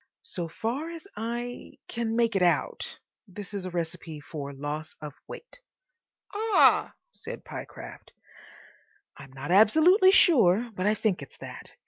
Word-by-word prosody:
"So 175 -2 -4
far 240 - -3
as 335 +2 -9
I—can 235 0 -4
make 230 -2 +2
it 195 - +2
out, 175 -1 +1 0.3
this 200 +1 -9
is 195 -2 -4
a - - -4
recipe 165 -2 -5
for 145 -1 -7
Loss 145 +3 -5
of 150 -2 -7
Weight. - - -10 0.7
("Ah!" 435 +1 +4 0.2
said - - -9
Pyecraft.) - - -9 1.1
I'm 135 - -12
not 135 +4 -6
absolutely 315 - +6
sure, 240 - +5
but 185 0 -1
I 210 - +3
think 205 -6 0
it's 140 - -11
that. - - -10
205 Hz, 135 wpm, -27 LUFS, 165-240 Hz, 1.1 s, absolutely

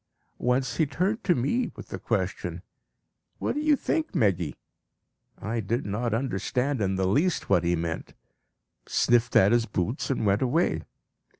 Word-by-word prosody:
Once 125 +1 0
he 160 - +3
turned 190 +9 -1
to 175 - +3
me 150 - 0
with - - -10
the - - -5
question, - - -2 0.7
'What - - -1
do 295 - -2
you 305 -1 +4
think, 320 +3 -2
Meggy?' 90 - +1 0.8
I 115 +2 -2
did 115 +5 -1
not 110 +4 -1
understand 125 +3 -1
in 95 -1 +1
the 95 0 0
least 155 - +1
what 90 - +4
he 85 0 +2
meant, 80 -1 -4 0.7
sniffed 120 0 +2
at 95 +2 +6
his 120 -1 +3
boots, 110 - -2
and 130 -5 0
went 100 0 +2
away. 145 +7 +1
120 Hz, 160 wpm, -27 LUFS, 100-145 Hz, 0.8 s, at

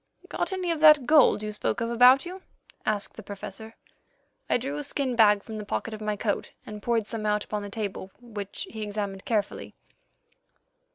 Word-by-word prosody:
"Got - - -2
any 370 -2 -1
of 330 - -2
that 305 -4 +7
gold 280 -6 +5
you 215 - -3
spoke 210 - -2
of 230 0 -2
about 250 +4 +6
you?" 370 +2 -8 0.5
asked 210 -2 0
the - - -7
Professor. 205 +2 -8 0.7
I - - +4
drew 270 +4 -4
a 295 - -3
skin 275 -3 -2
bag 210 -3 +5
from 220 -1 -7
the - - -5
pocket 220 +2 -3
of 215 - -7
my 210 -1 -1
coat, 205 0 -2 0.2
and 210 -1 -8
poured 230 -2 0
some 220 0 -5
out 210 0 +1
upon 210 -1 -4
the 205 - -6
table, 200 -2 -5
which 210 -5 -6
he 220 - -7
examined 205 -2 -4
carefully. 210 -3 -2
220 Hz, 190 wpm, -27 LUFS, 210-250 Hz, 0.7 s, that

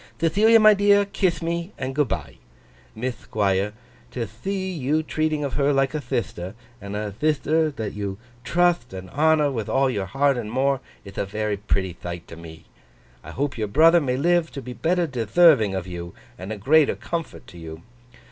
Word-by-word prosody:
'Thethilia 210 +8 +4
my 215 0 +7
dear, 205 0 +4
kith 185 -4 -1
me 170 +3 -3
and 130 0 -4
good 145 0 +1
bye! 75 -10 -5 0.6
Mith 120 +2 -5
Thquire, 100 -1 +1 0.4
to 120 -3 -4
thee 190 -1 -2
you 155 -1 0
treating 155 -1 -1
of 140 - -3
her 145 0 +2
like 135 0 +1
a 155 - -2
thithter, 115 -7 -4 0.3
and 100 0 -6
a 105 0 -3
thithter 155 +6 +1
that 110 -8 -5
you 100 -2 -4 0.3
trutht 170 - +1
and 95 0 -9
honour 155 -1 +3
with 115 -5 -4
all 135 0 +2
your 100 -5 -3
heart 135 +5 +2
and 110 -3 -5
more, 135 +2 +1 0.3
ith 100 0 -8
a - - 0
very 105 +1 -2
pretty 95 -3 -1
thight 85 0 -8
to - - -9
me. 80 -1 -12 0.6
I - - -10
hope 140 -3 -3
your 105 - -1
brother 165 +10 +5
may 130 -3 -1
live 170 +2 +2
to 140 - -5
be 125 +1 -7
better 175 +5 +1
detherving 120 - +3
of 90 - -4
you, 85 -2 -7 0.2
and 95 +3 -8
a 110 - -4
greater 145 +8 +4
comfort 170 -1 -5
to 85 - -12
you. 80 0 -9
135 Hz, 190 wpm, -23 LUFS, 100-160 Hz, 0.6 s, my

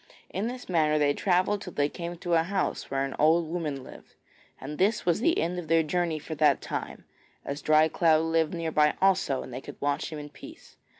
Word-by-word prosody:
In 200 +4 -2
this 250 +1 -7
manner 155 -4 +2
they 145 -1 +3
travelled 190 +4 +1
till 180 -4 -8
they 145 0 +1
came 170 +2 -6
to 175 0 -3
a 165 - +5
house 190 +3 -2
where 135 0 0
an 135 - -6
old 160 +2 +4
woman 155 -5 -3
lived, - - -14 0.4
and 150 +3 -7
this 205 +4 +2
was 175 0 +2
the 330 +9 +2
end 175 +2 -1
of 170 - -8
their 165 0 +3
journey 170 0 -1
for 160 +1 -7
that 150 -2 +3
time, - - -6 0.4
as 140 +1 -4
Dry 155 +1 +4
cloud 160 -1 +3
lived 165 0 +1
near 165 -1 -3
by 150 -1 +3
also 190 -8 +2
and 130 - -10
they 130 - -5
could - - -11
watch 145 +3 -1
him 155 - -5
in 150 0 -8
peace. - - -14
160 Hz, 225 wpm, -27 LUFS, 150-180 Hz, 0.4 s, a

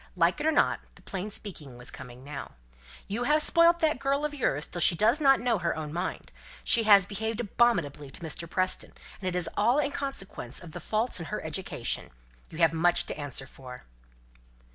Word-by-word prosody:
Like 175 - +2
it 300 - 0
or - - +4
not, 300 - +2 0.2
the - - -19
plain 195 +2 -5
speaking 155 - -6
was 120 - -3
coming 125 +1 -11
now. 140 0 -8 0.5
"You 230 +5 -2
have 300 +2 +4
spoilt 335 +1 +5
that 310 -5 +2
girl 280 +2 0
of 300 - -3
yours 150 - 0
till 175 - -5
she 170 - +7
does 225 - +3
not 270 -2 +5
know 235 -3 +1
her 170 -1 -1
own 155 -1 -5
mind. 175 - -4 0.3
She 230 -1 +4
has 200 -3 +7
behaved 220 +3 -3
abominably 190 - +1
to 135 - -11
Mr. 165 0 -4
Preston; 185 +1 0 0.3
and 185 - -4
it 180 - -5
is 180 -1 +1
all 235 +6 +3
in 290 -1 +1
consequence 195 - -4
of 175 -3 -11
the - - -7
faults 220 0 0
in 165 - -6
her 210 - -4
education. 160 -6 -3 0.4
You 155 - -10
have 165 -1 +4
much 170 +2 +3
to - - -4
answer 135 -2 -4
for." 130 -1 -12
190 Hz, 205 wpm, -28 LUFS, 160-245 Hz, 0.5 s, she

